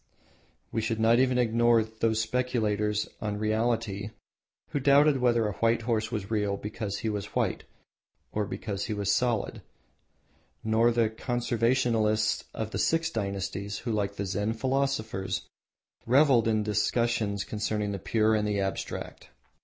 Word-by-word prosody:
We 115 - -1
should 115 0 -2
not 115 +2 +4
even 130 -1 +3
ignore 120 -1 +3
those 110 0 -1
speculators 110 -3 0
on 105 -1 -2
Reality 110 -1 -1 0.6
who 145 - -1
doubted 140 +1 +5
whether 120 -3 +2
a - - -1
white 115 0 +2
horse 110 -1 -1
was 105 -3 -4
real 105 -2 0
because 105 -1 -4
he 110 - -2
was 105 -1 -5
white, - - 0 0.7
or 105 -1 -1
because 100 -2 -4
he 110 - -3
was 100 -1 0
solid, 120 -1 0 1.0
nor 110 +2 +3
the 115 -1 +2
Conversationalists 115 -2 +1
of 110 0 -4
the - - -3
Six 165 0 +1
dynasties 100 -1 -3
who, 120 +1 -4
like 100 -2 -1
the 100 - -3
Zen 105 +3 -1
philosophers, 115 -5 -1 0.6
revelled 130 -2 +5
in 110 -1 +2
discussions 105 -1 0
concerning 105 -1 -2
the 100 - -4
Pure 110 +3 +2
and 105 -1 +1
the 105 -1 0
Abstract. 95 0 -4
110 Hz, 145 wpm, -28 LUFS, 105-120 Hz, 1.0 s, doubted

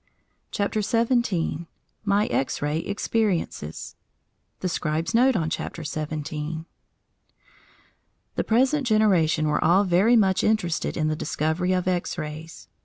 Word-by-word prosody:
CHAPTER 210 0 -1
XVII 220 - 0 0.4
MY 205 +1 +3
X 135 - -1
RAY 150 +2 -1
EXPERIENCES 200 - -2 0.7
THE 185 - 0
SCRIBE'S 160 -1 -2
NOTE 250 +2 +4
ON 165 -5 0
CHAPTER 165 - -4
SEVENTEEN 155 +1 -4 1.7
The - - -1
present 260 +4 +2
generation 180 -8 +3
were 150 - +1
all 180 +5 +5
very 195 +6 +4
much 195 -3 +3
interested 210 -7 0
in 155 -2 +1
the 155 - 0
discovery 160 +4 -1
of 180 -1 -1
X 180 -1 -1
rays. 155 - -7
175 Hz, 120 wpm, -25 LUFS, 155-215 Hz, 1.7 s, all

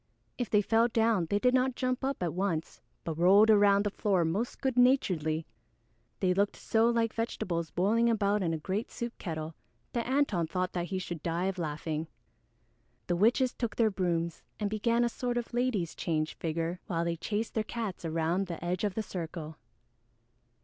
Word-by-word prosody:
If 245 - -2
they 210 -1 +3
fell 225 +3 +3
down 225 -6 +2
they 205 - +2
did 250 +4 +3
not 260 0 +2
jump 255 0 -1
up 270 -7 -1
at 170 - -1
once 175 -3 -2 0.2
but 165 -1 -4
rolled 200 +5 +6
around 200 -1 +5
the 205 - 0
floor 190 -5 +1
most 200 +9 -2
good 265 -2 0
naturedly. 180 - +2 0.8
They 185 -2 +3
looked 200 +2 +1
so 225 +1 +2
like 230 -1 +1
vegetables 175 -7 -2
boiling 220 +8 +2
about 210 -2 +2
in 170 -3 0
a 160 - -1
great 190 +8 -3
soup 235 0 -5
kettle 160 -2 -4 0.4
that 235 -1 -1
Antone 255 - +1
thought 185 +2 -2
he 175 +2 -2
should 175 -4 -5
die 170 +2 -1
of 190 -1 -2
laughing. 155 0 -3 1.0
The 175 - 0
witches 245 +7 +3
took 235 -4 -3
their 225 -2 +3
brooms 170 -3 -1 0.2
and 205 -1 -1
began 230 +2 +2
a - - +3
sort 245 +1 -2
of 240 0 -4
"ladies 240 -9 0
change" 155 -2 -1
figure 165 +2 -3
while 170 -4 -1
they 170 0 0
chased 210 +6 -3
their 220 - 0
cats 215 -5 -5
around 165 +4 0
the 170 0 -6
edge 180 +2 -1
of 205 -3 0
the 220 - -1
circle. 165 -4 -6
195 Hz, 185 wpm, -30 LUFS, 170-230 Hz, 1.0 s, rolled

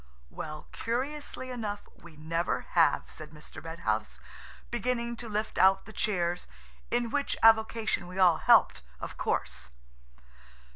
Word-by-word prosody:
"Well, 155 -1 -6
curiously 260 +2 -3
enough, 215 -4 -4
we 170 -2 -15
never 165 +2 -1
have," - - +4
said 155 -1 -10
Mr. 150 -1 -11
Red 165 +1 -7
House, - - -1 0.5
beginning 235 0 -1
to 235 -1 -7
lift 215 +1 -2
out 190 0 +5
the 220 - -11
chairs, 175 -5 -1 0.4
in 240 -1 0
which 285 -1 0
avocation 220 -3 +4
we 180 +1 -9
all 180 -4 +6
helped, - - +5 0.2
of - - -6
course. - - -2
210 Hz, 135 wpm, -30 LUFS, 170-235 Hz, 0.5 s, all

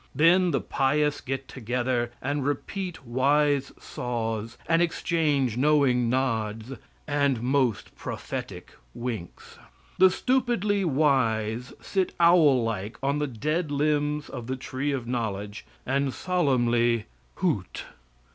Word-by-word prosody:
Then 175 +5 +5
the 140 - 0
pious 145 +2 +1
get 135 0 -4
together 120 0 -1
and 145 +1 -1
repeat 175 +4 -3
wise 140 +3 +2
saws 115 -2 -4
and 165 +2 +3
exchange 150 -8 +1
knowing 130 -4 +3
nods 115 -3 -1 0.4
and 140 -4 +1
most 130 -3 0
prophetic - - -6 0.2
winks. 115 -8 -6 0.4
The 190 0 +8
stupidly 210 -3 +1
wise 125 -7 +1
sit 190 -2 -1
owl 165 -7 +5
like 110 -2 -3
on 140 +2 +1
the 150 - 0
dead 150 +7 -2
limbs 150 0 0
of 120 -3 -7
the 130 - -2
tree 130 +2 -3
of 130 -4 -3
knowledge, 105 -4 -4 0.2
and 135 +1 0
solemnly, 120 -10 +1 0.3
hoot. 150 - -1
135 Hz, 115 wpm, -26 LUFS, 120-150 Hz, 0.4 s, The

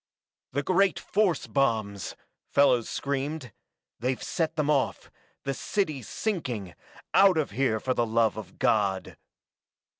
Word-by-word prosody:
"The 145 +2 0
great 190 +4 +3
force 200 -4 +1
bombs!" 110 - 0 0.3
Fellows 125 -5 +4
screamed. 140 -1 -3 0.5
"They've 125 +2 -1
set 165 -2 -1
them 150 -2 0
off 145 -3 0 0.3
the 135 - -1
city's 155 - -2
sinking 125 - -3 0.4
out 195 -3 +6
of 155 - 0
here, 115 -1 +1
for 130 +4 0
the 120 -2 +1
love 110 -1 +2
of 110 - -9
God!" 100 -3 +1
135 Hz, 125 wpm, -27 LUFS, 110-155 Hz, 0.5 s, out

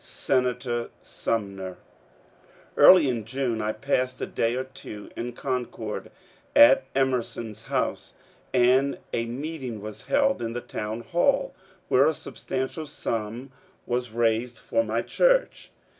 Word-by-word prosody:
Senator 125 -2 -1
Sumner! 100 -4 -3 1.0
.Early 180 -6 +8
in 120 -4 -1
June 120 -1 -2
I 105 0 0
passed 130 +2 -1
a - - -2
day 115 +1 0
or 130 - -1
two 105 -5 -10
in 120 +1 -4
Concord 125 -1 -4 0.5
at 290 -2 +8
Emer 130 -2 +3
son 115 -1 -7
s 105 - -13
house, - - -2 0.4
and 130 +3 +3 0.2
a 115 0 0
meeting 130 -2 -5
was 105 +1 -9
held 275 -1 +2
in 115 0 -3
the 120 - -2
town 110 -1 -5
hall, 225 - +1 0.3
where - - +5
a - - +1
substantial 130 +4 -4
sum 115 -2 -4 0.3
was 125 0 -1
raised 115 +1 0
for 285 - 0
my - - -1
church. - - +2
125 Hz, 135 wpm, -26 LUFS, 115-135 Hz, 1.0 s, Early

